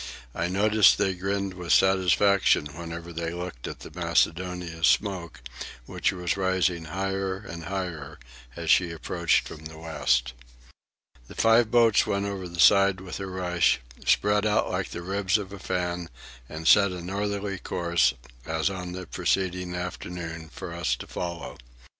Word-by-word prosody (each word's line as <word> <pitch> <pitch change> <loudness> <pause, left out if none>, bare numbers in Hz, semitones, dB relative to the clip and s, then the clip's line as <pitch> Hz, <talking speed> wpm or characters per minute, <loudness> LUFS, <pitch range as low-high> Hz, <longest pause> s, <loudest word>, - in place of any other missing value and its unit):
I 85 - -1
noticed 105 +2 +4
they 95 - +1
grinned 100 +1 -2
with 90 -2 -5
satisfaction 95 -1 +4
whenever 85 +1 -7
they 85 0 -3
looked 90 -9 -6
at - - -8
the - - -10
Macedonia's 85 -1 0
smoke, 90 - 0 0.4
which - - 0
was 90 -1 -2
rising 95 -3 0
higher 95 +3 -2
and 85 -5 -9
higher 90 -5 -5 0.4
as 85 -1 0
she 90 -2 +4
approached 85 +1 0
from 80 - -10
the 80 0 -9
west. 75 -7 0 0.9
The - - -12
five 115 0 +4
boats 115 -3 +4
went 100 0 0
over 100 -2 -4
the 85 0 -9
side 100 0 +6
with 95 0 -7
a 95 - -4
rush, 90 -2 +1 0.2
spread 105 0 +3
out 105 -1 +1
like - - -2
the 85 - -6
ribs 95 +2 +1
of 100 -2 -7
a 100 - -8
fan, 90 -2 -2 0.4
and 80 +1 -5
set 100 -2 +6
a 90 - -5
northerly 100 +1 -3
course, 85 -8 +1 0.3
as 80 +5 -1
on 90 -2 -6
the 90 0 -6
preceding 90 +1 -1
afternoon, 85 -2 -6
for 90 -3 -7
us 85 -8 0
to - - -9
follow. 85 -1 -6
90 Hz, 155 wpm, -26 LUFS, 85-95 Hz, 0.9 s, side